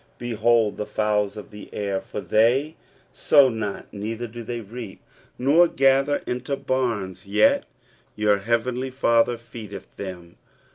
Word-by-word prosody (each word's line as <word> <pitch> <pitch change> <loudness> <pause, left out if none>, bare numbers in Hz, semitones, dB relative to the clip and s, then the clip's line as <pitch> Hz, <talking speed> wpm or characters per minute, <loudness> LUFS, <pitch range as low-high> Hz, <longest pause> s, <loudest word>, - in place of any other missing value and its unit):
Behold 115 -2 +1
the 105 - -4
fowls 105 -1 0
of 105 - -9
the 105 -1 -11
air: 100 -2 -2
for - - -6
they 130 +8 +2 0.4
sow 140 -3 +5
not, 110 -4 -4
neither 110 +3 -4
do 120 +1 -8
they 120 +1 -4
reap, 115 -1 -8 0.4
nor 150 +7 +5
gather 135 0 +2
into 125 +3 -2
barns; 115 -10 -2
yet 105 +2 +3 0.5
your 105 -1 +2
heavenly 120 +4 -1
Father 120 -2 +2
feedeth 115 -3 -10
them. 90 -3 -8
115 Hz, 135 wpm, -24 LUFS, 105-125 Hz, 0.5 s, sow